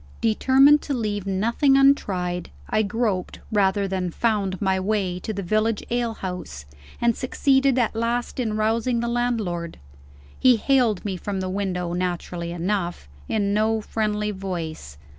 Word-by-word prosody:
Determined 265 +6 +5
to 280 - -3
leave 205 -4 -2
nothing 235 +8 +2
untried, 185 -11 +2 0.2
I 215 - +1
groped, 210 -3 -1
rather 200 -1 +2
than 185 -2 -2
found, 200 -2 0
my 190 -1 +1
way 190 -2 -1
to 220 - -4
the 200 -2 -4
village 215 +3 0
ale 240 -2 0
house, 180 - -6 0.3
and 235 -1 +2
succeeded 265 0 +2
at 235 -3 +1
last 235 +3 -1
in 220 -3 -1
rousing 230 +2 +1
the 235 - -1
landlord. 225 -9 -2 0.6
He 255 -1 +6
hailed 235 -4 +2
me 195 -3 -2
from 195 +2 -4
the 185 0 -3
window 180 -3 -2
(naturally 175 -1 -3
enough) 175 - -2 0.2
in 200 -2 0
no 220 +1 +2
friendly 210 -1 -1
voice. 170 - -6
210 Hz, 145 wpm, -24 LUFS, 185-235 Hz, 0.6 s, He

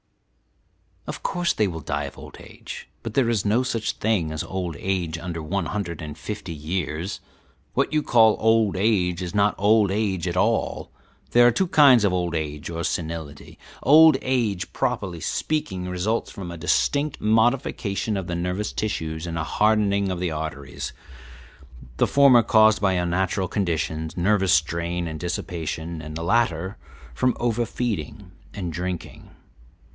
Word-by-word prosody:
"Of - - -6
course 175 -1 0
they 105 - +1
will 80 -3 -5
die - - -2
of - - -9
old - - -11
age; - - -10 0.2
but 115 - -5
there 125 -2 +2
is 110 -4 0
no 110 +4 +3
such 115 -4 -1
thing 100 -8 0
as 80 +1 -3
old 90 -4 -4
age 90 -4 -2
under 85 -2 -5
one 90 +2 -2
hundred 85 -6 -4
and 75 -1 -7
fifty 100 0 -6
years; 80 +2 -3 0.5
what - - 0
you 155 - +3
call 110 -5 +5
old 110 -2 +3
age 95 -3 +1
is 90 +2 -5
not 105 0 +3
old 105 0 +4
age 95 -4 -1
at 90 +1 -2
all. 110 +4 0 0.4
There 120 0 +6
are 120 - +6
two 185 +10 0
kinds 140 -8 +6
of 100 -3 +2
old 90 -2 -1
age 75 -2 -4
or 85 0 -4
senility. 80 -4 -5 0.2
Old 155 +3 +7
age, 115 -8 -1
properly 90 -4 -2
speaking, 150 - -2
results 90 +5 -1
from 95 -3 -7
a 85 - -7
distinct 145 - 0
modification 110 -2 +1
of 95 -2 -4
the 85 - -3
nervous 90 +4 -2
tissues 80 -6 -3
and 85 -1 -4
a 80 - -1
hardening 100 0 +2
of 90 -2 -3
the 90 -2 -1
arteries 75 -4 -5 1.0
the - - +3
former 140 -4 +6
caused 110 -2 +4
by 95 -2 +3
unnatural 90 +1 0
conditions, 80 -4 -2
nervous 95 0 +3
strain 85 +2 0
and 80 -1 -6
dissipation, 85 -1 -4
and 75 0 -8
the 80 - -4
latter 95 -2 0 0.4
from 125 - +1
over 120 0 0
feeding 100 -5 -4 0.2
and 90 -5 -4
drinking. 90 0 -5
95 Hz, 160 wpm, -24 LUFS, 85-110 Hz, 1.0 s, Old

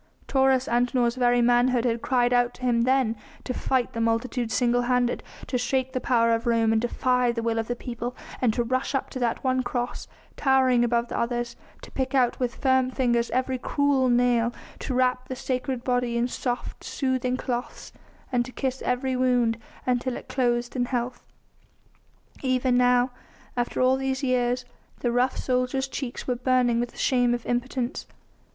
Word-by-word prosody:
Taurus 265 -1 +3
Antinor's 240 0 +2
very 245 -1 +3
manhood 245 0 +3
had 235 -1 0
cried 245 -1 +2
out 245 0 +2
to 250 - -13
him 235 -2 +2
then 255 -3 +2 0.3
to 255 - -3
fight 255 0 0
the 230 - -2
multitude 230 +1 0
single 245 0 +2
handed, 245 0 +1 0.2
to 250 - -1
shake 260 +1 -1
the 255 - -1
power 230 -2 +3
of 230 +1 -1
Rome 230 -1 +3
and 220 - +2
defy 250 0 +1
the 230 -1 -3
will 230 -1 0
of 225 - -2
the 245 - -2
people, 240 0 -5 0.3
and 245 -3 +3
to 240 - +1
rush 255 +3 -1
up 270 - -2
to 255 - -5
that 240 -2 -1
one 260 -1 +2
Cross, 245 -1 -3 0.3
towering 260 -3 +3
above 235 0 +1
the - - -2
others, 240 0 -2 0.3
to - - -11
pick 265 +1 -2
out 250 -2 +2
with 250 -1 -1
firm 260 -1 +2
fingers 240 -2 +1
every 255 0 -1
cruel 280 -1 +1
nail, 240 -1 +3 0.3
to 255 - -3
wrap 255 0 +1
the 260 - -4
sacred 255 -1 -3
body 245 -2 0
in 235 +1 +1
soft, 245 0 -4
soothing 255 -2 -1
cloths, 245 -1 -5 0.4
and 245 -1 +2
to 255 - -10
kiss 260 0 -3
every 255 +1 0
wound 250 -3 +2 0.3
until 250 0 0
it - - -11
closed 240 -2 0
in 245 -1 +1
health. 245 0 -3 1.1
Even 255 -1 +1
now, 250 0 +3 0.4
after 245 -1 -2
all 255 +1 +4
these 265 0 -2
years, 250 -1 +1 0.4
the 240 - +1
rough 250 +2 +1
soldier's 255 +1 0
cheeks 265 -2 -5
were 250 - +1
burning 250 -1 +2
with 240 0 -1
the - - -18
shame 245 -2 +2
of 240 - -7
impotence. 245 +1 -2
250 Hz, 180 wpm, -25 LUFS, 240-255 Hz, 1.1 s, all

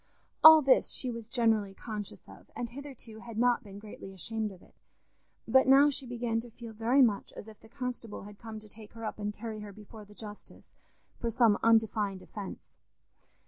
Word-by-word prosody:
All 315 -1 +11
this 265 -1 +4
she 255 - -2
was 230 -1 -8
generally 220 -5 +1
conscious 210 -2 -7
of, - - -15
and 235 -1 -4
hitherto 255 -5 -10
had 230 -1 -9
not 245 +1 +2
been 200 -2 -11
greatly 205 -2 -10
ashamed 220 +3 -3
of 185 -2 -15
it. - - -22 0.7
But 265 0 +5
now 280 +2 +7
she 270 -1 -4
began 235 -1 -2
to 240 - -12
feel 230 0 -10
very 235 +5 +4
much 210 -5 0
as - - -10
if 215 -1 -13
the 225 - -18
constable 250 -5 -6
had 205 0 -12
come 225 -2 -8
to 215 - -13
take 210 0 -14
her 225 -1 -7
up 215 - -5
and 205 0 -2
carry 215 +1 -7
her 210 -1 -8
before 215 +2 -12
the 210 +1 -17
justice 210 +1 -12 0.5
for 235 - -1
some 230 -2 +4
undefined 215 -4 +2
offence. 205 -3 -9
225 Hz, 195 wpm, -30 LUFS, 210-240 Hz, 0.7 s, All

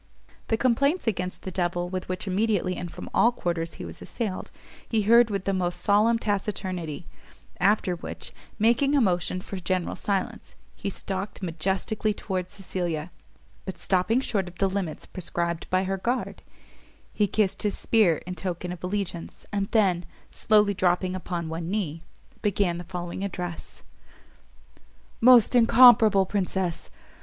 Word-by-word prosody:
The 225 - +1
complaints 280 +8 +2
against 185 -5 -2
the 190 - -5
devil 175 -1 -1
with 185 0 -5
which 185 +1 -3
immediately 195 -2 0
and 175 -2 -5
from - - -8
all 235 - +5
quarters 170 -7 -3
he - - -7
was - - -9
assailed, 215 -6 -4 0.4
he 220 -2 +1
heard 235 +2 +6
with 200 -2 -3
the 195 - +1
most 180 -2 -1
solemn 215 +3 +3
taciturnity: 190 -7 -3 0.5
after 200 -3 +2
which, 170 - -7 0.3
making 235 +6 +3
a - - +5
motion 185 -4 +1
for 195 - -7
general 185 -1 -1
silence, 200 -2 -3 0.2
he 200 - -4
stalked 195 +1 -5
majestically 190 +5 -1
towards 185 -4 -4
Cecilia, 175 -4 -3 0.5
but 190 - -6
stopping 200 +7 +1
short 200 -8 -1
of 175 -1 -11
the 195 - +2
limits 190 -4 -3
prescribed 170 -2 -3
by 185 0 +2
her 195 0 -1
guard, 240 +7 -2 0.7
he 210 - +2
kissed 200 -1 0
his 205 -2 -1
spear 205 -9 +3
in 180 - -5
token 180 -1 -4
of 180 -1 -8
allegiance, 185 -3 -4
and 200 -1 0
then, 190 -6 +2 0.3
slowly 210 -2 +3
dropping 185 0 +1
upon 175 -2 -4
one 165 +1 -4
knee, 175 -6 -2 0.4
began 195 -4 +1
the - - -6
following 175 +1 -5
address: 180 -4 -6 1.4
"Most 245 -1 +7
incomparable 225 -4 +7
Princess! 185 -3 -2
190 Hz, 150 wpm, -26 LUFS, 180-210 Hz, 1.4 s, Most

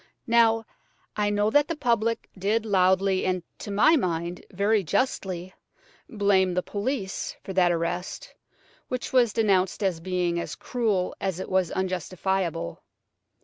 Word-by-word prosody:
Now, 225 -1 +4 0.5
I 205 -1 +1
know 205 +1 +1
that 290 +3 +4
the 335 - -2
public 230 -5 0
did 210 +4 0
loudly, 190 -1 +3
and, 185 -1 0 0.2
to - - -7
my 215 +11 +5
mind, 175 - -2
very 200 +2 +1
justly, 185 - -1 0.6
blame 195 -4 +2
the 180 - +1
police 205 -1 -3
for 190 - -6
that 180 -2 +4
arrest, 175 +2 -3 0.5
which 255 +1 -4
was 245 -4 +4
denounced 195 -2 +1
as 185 -4 0
being 175 -1 -1
as - - -5
cruel 215 -7 -1
as 190 -2 -2
it - - -5
was 185 -2 +2
unjustifiable. 185 - -2
190 Hz, 140 wpm, -26 LUFS, 180-220 Hz, 0.6 s, my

